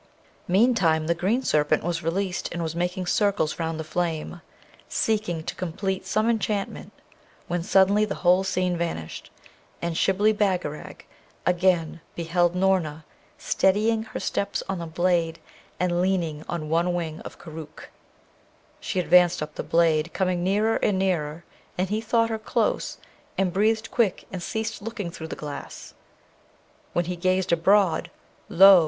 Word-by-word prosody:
Meantime 185 -6 +3
the 170 - +2
green 200 +10 0
serpent 150 -7 +2
was 170 0 -1
released 180 +2 -2
and 170 0 -3
was 160 0 -3
making 180 +2 -1
circles 200 -4 +1
round 165 -1 -2
the - - -2
flame, 165 +1 -3 0.5
seeking 210 -7 0
to - - -4
complete 190 +2 -3
some 215 +1 +1
enchantment, 215 -3 -1 0.6
when 175 0 -1
suddenly 195 +3 +4
the 210 -2 -2
whole 180 +2 +5
scene 185 -2 0
vanished, 165 - -4 0.5
and 170 -1 -2
Shibli 200 +5 +3
Bagarag 185 -8 -2 0.4
again 175 -2 +2
beheld 175 +1 +1
Noorna 180 -5 +1 0.3
steadying 215 +4 +2
her 220 - -6
steps 200 0 -2
on 190 -2 -2
the 170 - -5
blade, 170 -1 +1 0.4
and 175 -1 +1
leaning 170 -5 0
on 165 -3 -3
one 170 +3 +1
wing 160 -3 -3
of - - -10
Koorookh. 155 -2 -10 0.9
She 185 - -2
advanced 175 0 +4
up 150 0 -7
the - - -4
blade, 165 -1 +2
coming 180 -2 0
nearer 210 +4 +2
and 200 - +1
nearer; 170 -4 -1 0.3
and 185 +1 0
he 215 +2 0
thought 230 0 +1
her 220 - -2
close, - - -1 0.4
and 190 -2 +1
breathed 220 +3 +1
quick 225 -6 +1
and 185 - -5
ceased 220 +4 -3
looking 210 -5 -5
through 160 -1 -7
the - - -5
glass. 145 -1 -8 1.0
When 175 - +1
he 180 +1 -3
gazed 185 +1 +1
abroad, 175 0 +3 0.4
lo! 190 +1 +9
180 Hz, 150 wpm, -25 LUFS, 165-195 Hz, 1.0 s, lo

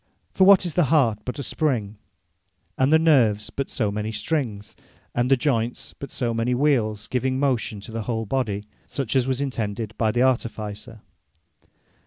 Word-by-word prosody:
For 190 - +4
what 195 -1 +7
is 170 - -2
the 175 - +3
Heart, 125 -7 +3
but 125 - -4
a 140 - -4
Spring; 120 -9 -1 0.8
and 130 +2 +2
the 160 - +7
Nerves, 120 -10 +3
but 140 - -3
so 105 -5 -1
many 105 +1 -3
Strings; 110 -7 -3 0.4
and 120 +1 0
the 135 - +5
Joynts, 120 -3 -1
but 140 - -7
so 120 -3 -1
many 115 +2 0
Wheeles, 115 -7 +1
giving 130 +1 -1
motion 125 -6 0
to 110 - -9
the 115 0 -3
whole 110 0 -2
Body, 105 -4 -1 0.2
such 135 -3 -3
as 130 -1 +3
was 130 -1 0
intended 110 -4 -3
by 110 - +2
the 120 +3 +2
Artificer? 110 -4 -2
120 Hz, 175 wpm, -24 LUFS, 110-135 Hz, 0.8 s, what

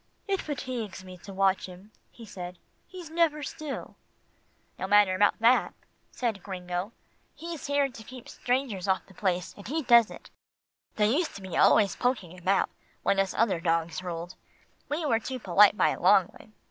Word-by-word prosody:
"It 390 -1 0
fatigues 250 -9 -5
me 185 -1 -10
to 200 - -11
watch 195 0 +1
him," 185 +3 -13 0.2
he 235 - -13
said. 180 -3 -8 0.3
"He's 355 -4 -10
never 320 -3 +1
still." 295 0 -6 0.8
"No - - -3
matter 205 -2 +5
about 205 +2 +3
that," 235 +3 +3 0.4
said 225 -6 -2
Gringo, 180 +1 -4 0.4
"he's 330 -1 -7
here 285 0 +2
to 240 -4 -11
keep 255 +1 -11
strangers 245 -7 -2
off 190 -1 +1
the 195 - -18
place, 180 -2 -1
and 200 - -11
he 315 +5 -2
does 235 -3 +6
it. - - -12 0.6
They 215 +3 +2
used 345 -1 -1
to 200 - -8
be 190 -2 -6
always 205 -4 +4
poking 220 -9 -1
about, 185 +2 +1 0.3
when 195 - +2
us 195 -1 0
other 200 -6 +2
dogs 165 0 0
ruled. 175 0 -6 0.6
We 305 +2 -2
were 230 -6 +2
too 260 +3 -5
polite 205 -1 +5
by - - +4
a - - -4
long 190 0 +5
way. - - -16
205 Hz, 175 wpm, -28 LUFS, 185-255 Hz, 0.8 s, does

